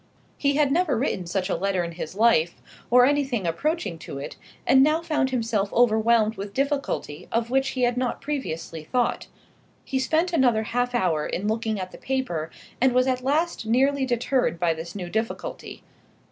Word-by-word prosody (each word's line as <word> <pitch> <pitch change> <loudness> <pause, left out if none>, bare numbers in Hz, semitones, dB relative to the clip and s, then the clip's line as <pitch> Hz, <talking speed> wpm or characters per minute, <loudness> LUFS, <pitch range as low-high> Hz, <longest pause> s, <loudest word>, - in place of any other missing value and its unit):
He 280 -1 +1
had 290 -2 +3
never 315 -5 +2
written 190 -8 -1
such 185 +1 -1
a - - 0
letter 190 -2 0
in 170 - -4
his 165 0 -7
life, 200 -7 +3 0.3
or 245 +1 +7
anything 270 -7 +1
approaching 200 - -1
to 140 - -8
it, 140 - -6 0.3
and 265 - +6
now 305 +4 +3
found 300 -5 0
himself 225 -5 -1
overwhelmed 225 -1 +3
with 200 - -4
a - - -24
difficulty 275 - -2
of 230 +1 -1
which 270 +1 +2
he 250 - +1
had 245 0 +2
not 250 -1 -1
previously 165 - -4
thought. 245 +9 -1 0.6
He 265 - -1
spent 320 +7 +1
another 245 -8 +3
half 245 +2 -1
hour 165 -9 +1
in 200 +4 -3
looking 220 -1 -1
at 185 -1 -5
the - - -12
paper, 175 -13 -2 0.3
and 260 -1 +4
was 255 0 +4
at 255 -1 0
last 295 -2 0
nearly 265 +3 +2
deterred 245 -6 0
by 170 -2 +2
this 165 +3 -8
new 185 -3 -5
difficulty. 220 +5 -4
235 Hz, 185 wpm, -25 LUFS, 190-270 Hz, 0.6 s, or